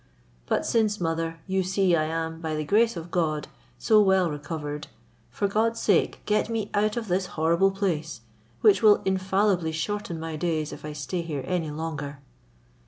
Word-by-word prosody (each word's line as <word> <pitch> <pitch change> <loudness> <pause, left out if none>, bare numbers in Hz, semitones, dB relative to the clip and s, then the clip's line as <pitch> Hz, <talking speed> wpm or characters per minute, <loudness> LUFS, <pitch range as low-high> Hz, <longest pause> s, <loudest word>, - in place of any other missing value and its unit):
But - - 0
since, 215 -2 +1
mother, 165 -1 -2
you 190 0 0
see 185 -1 +2
I 155 -1 +1
am, 160 +1 -3
by 160 -2 -2
the 155 - -2
grace 220 +3 +3
of 165 +1 -7
God, 155 -4 0 0.3
so 215 -2 +4
well 190 -4 +3
recovered, 150 0 -5 0.4
for 160 +12 -1
God's 225 +3 +1
sake 200 -5 +2
get 210 +1 +1
me 225 -3 -2
out 210 +3 +1
of 230 -2 -3
this 185 0 0
horrible 170 +5 +3
place, 170 - -2 0.4
which 210 -3 +5
will 215 -2 +6
infallibly 190 -2 +1
shorten 170 +1 -3
my 160 0 -5
days 155 -2 -1
if - - -10
I 150 0 -5
stay 150 +4 -3
here 150 -5 -4
any 175 -4 -1
longer." 150 -2 -5
175 Hz, 170 wpm, -26 LUFS, 160-200 Hz, 0.4 s, will